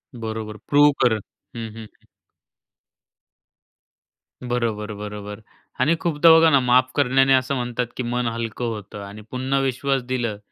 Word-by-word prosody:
बरोबर 110 -2 -5
प्रूव्ह 145 0 +6
कर. 120 -2 +4 0.4
हं, 115 -1 -5
हं, 115 - -8
हं. 110 - -16 2.4
बरोबर, 115 -3 -2
बरोबर 105 0 -7 0.4
आणि 150 +6 +3
खूपदा 165 -1 +4
बघा 165 0 +6
ना 140 -3 +5
माफ 125 +1 +3
करण्याने 135 -1 +3
असं 130 +1 +2
म्हणतात 120 -1 -2
की 130 - -2
मन 120 0 -1
हलकं 115 0 -3
होतं 105 -1 -9
आणि 100 +2 -10
पुन्हा 130 +2 -1
विश्वास 135 +1 0
दिलं 120 -5 -2
125 Hz, 135 wpm, -22 LUFS, 110-135 Hz, 2.4 s, प्रूव्ह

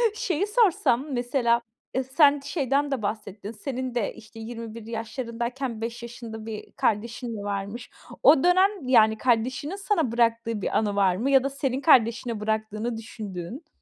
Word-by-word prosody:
Şeyi 375 -2 -1
sorsam, 350 - +2
mesela, 245 -1 +1 0.3
e, 260 - 0
sen 285 +2 +4
şeyden 280 0 0
de 260 -5 -1
bahsettin. 205 0 -4
Senin 255 +2 -5
de, 230 - -1
işte, 225 0 -13
21 230 -1 -7
yaşlarındayken 235 +1 -4
5 235 +1 -5
yaşında 230 -2 -8
bir 220 -2 -7
kardeşin 230 +1 -1
varmış. 205 +3 -4 0.3
O 280 0 +7
dönem, 370 -3 +3
yani, 220 -3 +5
kardeşinin 255 - 0
sana 390 - 0
bıraktığı 230 -2 +1
bir - - 0
anı 205 -2 0
var 190 -3 +3
mı 260 +8 0
ya 270 -1 +6
da 275 - 0
senin 270 -1 -2
kardeşine 235 -5 +3
bıraktığını 220 +2 -2
düşündüğün? 220 - -7
235 Hz, 150 wpm, -26 LUFS, 220-275 Hz, 0.3 s, O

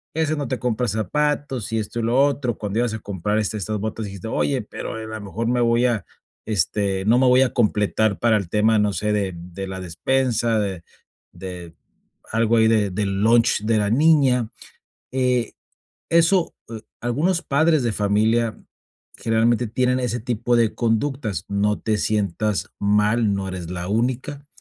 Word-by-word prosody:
este, 155 -1 0
no 145 -4 -3
te 130 - -2
compra 125 0 -1
zapatos 130 +3 -1
y 110 - 0
esto, 110 +2 -3
y - - -1
lo 120 +3 +2
otro, 140 -5 -1
cuando 105 +2 -3
ibas 120 -2 0
a - - -6
comprar, 105 +1 -2
este, 105 0 -1
estas 105 +2 -3
botas 110 +1 -4
dijiste: 100 +1 -7
"Oye, 130 +1 0
pero, 110 - -6
e - - -6
a - - -7
lo 110 -1 -6
mejor 110 +3 -4
me 120 0 +1
voy 120 +1 +3
a, 115 -4 0 0.4
este, 100 -1 0
no 115 +3 +4
me 130 - +3
voy 125 +1 +5
a 130 - +2
completar 105 -2 +1
para 115 -2 +3
el 95 -4 -4
tema, 110 +2 +3
no 105 -1 +2
sé, 105 +1 -1
de 100 -3 -1
de 90 +3 -7
la 95 0 -6
despensa, 115 +5 0
de 95 -4 -3 0.5
de 90 -2 -8 0.6
algo 115 +1 +2
ahí 110 0 +5
de 110 -3 +2
del 100 0 -2
lunch 115 -1 +3
de 110 0 +2
la 105 - 0
niña". 130 -3 +3 0.6
Eh, 125 -3 0 0.6
eso, 170 +2 +3 0.2
eh, 110 -1 -7 0.2
algunos 160 +10 0
padres 155 0 +2
de 120 - 0
familia 110 +3 +1 0.6
generalmente 115 +1 +1
tienen 125 +3 +1
ese 120 -1 -2
tipo 120 0 -1
de 115 -2 +2
conductas. 115 - -1
No 105 +1 0
te 110 -1 0
sientas 105 0 -1
mal, 105 +1 +2
no 95 -1 -3
eres 90 -3 -6
la 90 0 -5
única. 130 +6 -2
110 Hz, 180 wpm, -22 LUFS, 105-125 Hz, 0.6 s, voy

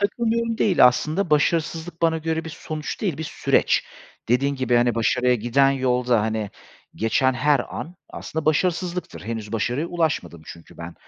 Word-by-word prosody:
"takılmıyorum" 230 +2 0
değil 190 -6 +4
aslında. 155 +8 0
Başarısızlık 165 +2 0
bana 160 -1 +3
göre 160 0 -2
bir 160 - -6
sonuç 155 -1 -6
değil, 185 -9 -2
bir - - -3
süreç. - - +2 0.4
Dediğin 140 +4 +2
gibi, 130 -2 0
hani, 120 -1 +3
başarıya 125 +2 +2
giden 120 +4 +2
yolda, 125 -3 +1
hani, 110 -2 -2 0.4
geçen 120 +4 +1
her 145 +1 +2
an 170 - -7 0.2
aslında 160 0 -5
başarısızlıktır. 180 +3 -1
Henüz 110 -1 -6
başarıya 120 +8 -1
ulaşmadım 160 - -2
çünkü 85 -1 -12
ben. 85 0 -8
145 Hz, 150 wpm, -23 LUFS, 120-165 Hz, 0.4 s, değil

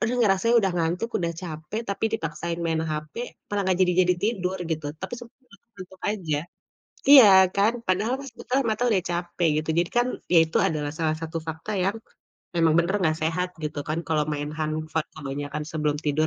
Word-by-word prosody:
aduh 235 +3 0
ngerasa 195 -3 +3 0.2
udah 195 -3 0
ngantuk, 175 +7 0
udah 170 -1 -1
capek, 160 +5 -5
tapi 200 +2 -2
dipaksain 170 -3 -3
main 160 -1 0
HP, 150 0 -5 0.4
malah 205 - +1
nggak 185 - +3
jadi 180 - +1 0.2
jadi 180 - +4
tidur 190 -4 0
gitu. 155 -2 -2
Tapi 190 - -6
sempat 235 -1 -13 0.4
ngantuk 185 -1 -12
aja, 170 -8 -2 0.7
iya 270 -6 +11 0.3
kan, 205 +3 +3
padahal 205 +7 +1
pas 275 - -8
kita 250 - -4 0.2
mata 215 +2 -1
udah 195 - +3
capek 175 0 -1 0.2
gitu 160 - -2
jadi 170 0 +2
kan 240 - +3 0.3
ya - - +8
itu 160 - 0
adalah 150 -2 -3
salah 155 -1 0
satu 165 0 -4
fakta 160 +7 -5
yang 195 +4 0 0.6
memang 165 -2 +4
benar 170 +4 -1
gak 155 0 0
sehat 175 +3 0 0.2
gitu 150 0 -4
kan, 155 +2 -1
kalau 155 -2 +2
main 145 0 -3
handphone 155 +1 -2
kebanyakan 145 0 -4
sebelum 150 -2 0
tidur 150 +1 +2
170 Hz, 185 wpm, -25 LUFS, 155-195 Hz, 0.7 s, iya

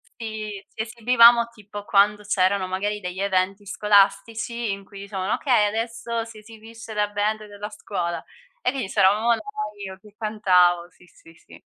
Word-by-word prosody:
sì, 215 -3 -6
ci 220 - -6
esibivamo 235 +1 +5
tipo 205 -2 -10
quando 210 +1 +3
c'erano 190 -1 +1
magari 205 +3 -2
degli 180 -1 -6
eventi 195 +1 0
scolastici 210 +3 +1
in 195 0 -6
cui 200 -1 -12
dicevano: 200 0 -3
"Okay, 245 -7 +3
adesso 230 +1 -3
si 225 -1 -12
esibisce 225 +1 -11
la 210 0 0
band 210 +1 -1
della 205 0 -7
scuola." 180 -5 -4 0.4
E - - +1
quindi 260 -8 -4
c'eravamo 210 +5 +3
noi, 220 -3 -5
io 190 0 -8
che 210 +1 -18
cantavo, 180 -5 +3
sì, 180 - -21
sì, 165 0 -19
sì. - - -17
210 Hz, 160 wpm, -24 LUFS, 195-225 Hz, 0.4 s, esibivamo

